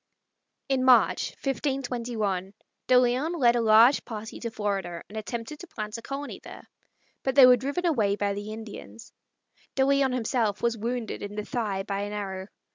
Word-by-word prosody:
In 265 -2 +1
March, 255 -1 +4
1521, 240 -9 -2 0.3
De 255 - +6
Leon 255 +7 +1
led 240 -5 +4
a 240 - +2
large 225 +4 +6
party 220 -1 -7
to 235 - -4
Florida 195 -6 -3
and 210 - -13
attempted 230 +6 -5
to 355 - -10
plant 215 -7 -6
a - - -11
colony 275 +4 -6
there, - - -11 0.6
but 265 -1 -1
they 270 - +10
were 250 0 +8
driven 280 +9 -3
away 220 -12 +2
by 205 -1 -1
the 205 +1 -6
Indians. 220 +1 -10 0.6
De 265 - +3
Leon 275 -1 +3
himself 230 -4 -1
was 235 -1 +2
wounded 235 +1 -4
in 205 0 -6
the 210 0 -4
thigh 205 -5 -2
by 195 0 -3
an 205 +1 -4
arrow. 190 -2 -5
230 Hz, 175 wpm, -27 LUFS, 205-260 Hz, 0.6 s, they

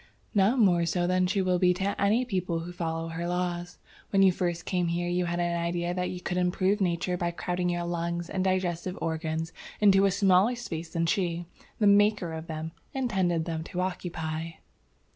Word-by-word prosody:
"Not 205 +4 +3
more 180 -7 +4
so 175 +1 +1
than 185 0 +2
she 195 +1 +1
will 180 -1 +1
be 180 0 +4
to 195 +2 -2
any 215 +5 +3
people 180 -7 -1
who 175 +2 -7
follow 165 -1 -3
her 165 +1 -4
laws. 175 0 -2 0.3
When 195 -1 +4
you 190 - +7
first 175 -1 -2
came 180 -2 0
here 175 +1 -1
you 175 0 0
had 170 0 -2
an 175 0 0
idea 170 +1 -1
that 180 0 -1
you 180 - -5
could 180 0 -3
improve 185 +3 +1
nature 180 0 0
by 175 -1 0
crowding 180 +1 -2
your 175 0 -1
lungs 170 0 -2
and 185 0 -2
digestive 185 -1 -1
organs 160 0 -2 0.3
into 195 -2 +5
a - - +5
smaller 195 +3 +4
space 170 -9 -5
than 165 0 -1
she, 175 -1 0 0.3
the 210 - +1
maker 205 -4 +4
of 160 +1 -6
them, 160 0 -5 0.2
intended 190 -10 0
them 160 -1 -3
to 180 0 -3
occupy. 165 -3 -3
175 Hz, 195 wpm, -28 LUFS, 170-190 Hz, 0.3 s, you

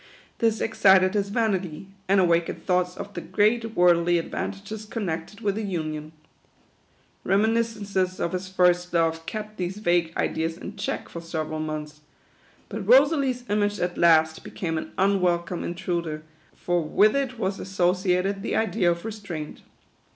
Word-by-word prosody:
This 225 -1 +1
ex 225 - -3
cited 190 -1 +6
his 200 -1 0
vanity, 195 -7 -1 0.2
and 195 +1 +4
awakened 170 -2 +1
thoughts 180 0 +1
of 205 - -7
the - - -5
great 225 +2 +1
worldly 175 -1 +4
advantages 200 +5 -5
connected 200 -2 -4
with 205 -1 -1
a - - -2
union. 155 -6 -4 1.1
Remi 200 +4 +3
niscences 205 -5 -1
of 170 - -1
his 185 0 -4
first 180 -1 +2
love 165 -1 +1
kept 215 0 -6
these 185 +2 -3
vague 175 -5 +1
ideas 165 +1 -1
in - - -8
check - - -3
for 170 - -8
several 155 -2 -4
months; 150 -1 -5 0.7
but 215 +1 -5
Rosalie's 265 0 +4
image 205 0 0
at 175 0 -1
last 160 -2 +4
became 165 -5 -3
an - - -8
unwelcome 180 -3 +1
intruder; 170 -3 -3 0.3
for 175 -1 0
with 205 - +3
it 265 -3 -1
was 195 -3 -2
asso 180 -2 +1
ciated 185 +1 0
the - - -2
idea 220 -5 +2
of 170 +2 -2
restraint. 200 -9 -6
185 Hz, 150 wpm, -25 LUFS, 170-210 Hz, 1.1 s, cited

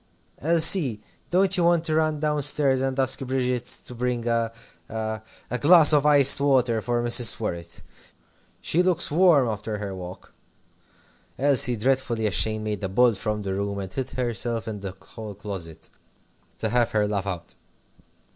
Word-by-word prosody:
Elsie, 160 - +3 0.3
don't 190 +2 +2
you 180 - 0
want 170 -1 +2
to 160 - -1
run 155 -1 0
down 150 -1 -1
stairs 140 -2 +1
and 135 0 -3
ask 130 -1 +3
Bridget 125 -2 -3 0.2
to - - -10
bring 120 -1 -3
a 115 -1 -1 0.4
a 110 -1 -5 0.3
a 125 - -3
glass 160 0 +7
of 145 0 +3
iced 140 -2 +6
water 125 -5 +1
for 120 0 -2
Mrs. 120 -2 +3
Worrett? 85 -6 -6 0.8
She 170 - 0
looks 180 -5 +1
warm 160 -5 +3
after 105 0 -5
her 100 -1 -6
walk." 90 -1 -11 1.0
Elsie, 135 -3 +4
dreadfully 120 -1 -1
ashamed, 110 +1 -1
made 105 -2 -5
a 95 - -3
bolt 120 +3 +2
from 105 0 -4
the 95 -1 -4
room, 100 +1 -4
and 95 -1 -7
hid 130 -1 -4
herself 120 -2 -3
in 105 -2 -6
the 95 -1 -8
hall 110 -3 -10
closet 95 -6 -9 0.7
to 110 - -3
have 120 +1 0
her 105 -1 +1
laugh 100 -1 -3
out. 85 -3 -7
120 Hz, 165 wpm, -23 LUFS, 105-140 Hz, 1.0 s, glass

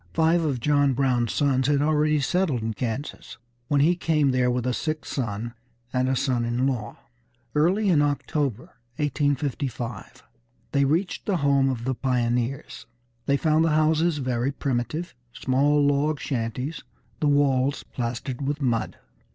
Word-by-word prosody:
Five 165 +1 +3
of 140 -5 -1
John 145 +1 +3
Brown's 125 -3 +1
sons 135 -3 +1
had 145 -1 +3
already 150 0 +2
settled 150 -6 0
in 110 0 -2
Kansas 125 +5 -5 0.3
when 145 0 +2
he 170 +5 +4
came 155 -5 +2
there 125 -1 +2
with 125 -1 -1
a 125 - 0
sick 155 +4 -3
son 115 -2 -3 0.4
and 130 0 +1
a 135 - +1
son 125 -2 0
in 120 +2 0
law. 120 -6 -2 0.6
Early 185 +8 +2
in 165 -6 +4
October, 145 -4 -2 0.2
1855, 140 -5 -2 0.5
they 140 -1 +3
reached 165 +7 -1
the 195 -3 +2
home 140 -1 +3
of 120 -3 -3
the 130 +2 0
pioneers. 125 0 -2 0.4
They 140 - +3
found 155 +1 +2
the 165 -2 +2
houses 155 +1 +2
very 130 -1 -1
primitive, 140 +6 -3 0.2
small 145 +3 +2
log 145 +1 +1
shanties, 125 +4 -3 0.4
the 150 - +1
walls 140 -1 +2
plastered 125 +1 -4
with 145 +2 -2
mud. 120 -5 -1
140 Hz, 150 wpm, -25 LUFS, 125-150 Hz, 0.6 s, he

